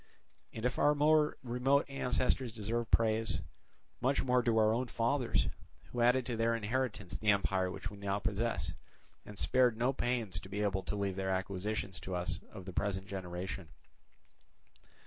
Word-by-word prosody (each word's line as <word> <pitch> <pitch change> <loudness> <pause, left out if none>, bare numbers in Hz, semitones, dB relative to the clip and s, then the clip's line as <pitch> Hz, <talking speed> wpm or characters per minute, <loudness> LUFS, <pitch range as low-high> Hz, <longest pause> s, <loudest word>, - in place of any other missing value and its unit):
And 110 - -5
if 125 - 0
our 150 0 +5
more 150 +1 +4
remote 130 +3 +2
ancestors 130 -2 0
deserve 115 +2 -2
praise, 110 -1 +2 0.6
much 130 +3 +2
more 125 -1 +3
do 115 -2 +2
our 110 0 +5
own 125 +2 0
fathers, 115 - +1 0.4
who 120 - -2
added 125 +1 +4
to 120 - -2
their 115 +1 +2
inheritance 115 -3 -2
the 105 - 0
empire 95 -2 +2
which 100 +2 -5
we 100 - -10
now 100 0 -1
possess, 110 +2 -1 0.5
and 105 - -9
spared 125 -1 +3
no 125 +3 +2
pains 120 -9 -1
to 95 - -11
be 100 +2 -2
able 100 -2 +1
to - - -2
leave 100 -2 -2
their 95 0 -1
acquisitions 95 0 -2
to 90 +3 -4
us 90 0 -1
of 95 -4 -9
the 95 - -7
present 95 0 -1
generation. 90 -2 -5
110 Hz, 165 wpm, -34 LUFS, 95-125 Hz, 0.6 s, our